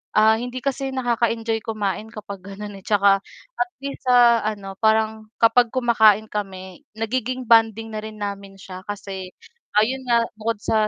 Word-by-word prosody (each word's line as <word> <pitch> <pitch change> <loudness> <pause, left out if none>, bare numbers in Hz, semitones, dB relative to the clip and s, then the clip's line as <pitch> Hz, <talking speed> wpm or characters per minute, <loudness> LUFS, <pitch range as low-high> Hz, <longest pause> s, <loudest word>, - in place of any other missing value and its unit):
ah, 220 +1 +6
hindi 245 +2 -5
kasi 270 -1 -2
nakaka-enjoy 230 -3 0
kumain 215 -1 -2
kapag 200 -3 -8
ganon 200 +1 -8
eh, - - -20
tsaka 200 -1 +4 0.4
at 360 0 +1
least 275 0 -7
sa 240 -3 +5
ano 200 -3 -4
parang 220 0 +1
kapag 230 +1 +4
kumakain 220 -4 +4
kami 190 -3 -6
nagiging 250 +2 -3
bonding 225 -1 +4
na 215 -1 -5
rin 215 -1 -9
namin 200 -1 -5
siya 185 -1 -9
kasi 195 -2 -6 0.4
ayun 255 +5 +1
nga 235 -1 +4 0.2
bukod 225 +1 -1
sa 215 -1 +2
220 Hz, 155 wpm, -22 LUFS, 205-235 Hz, 0.4 s, ah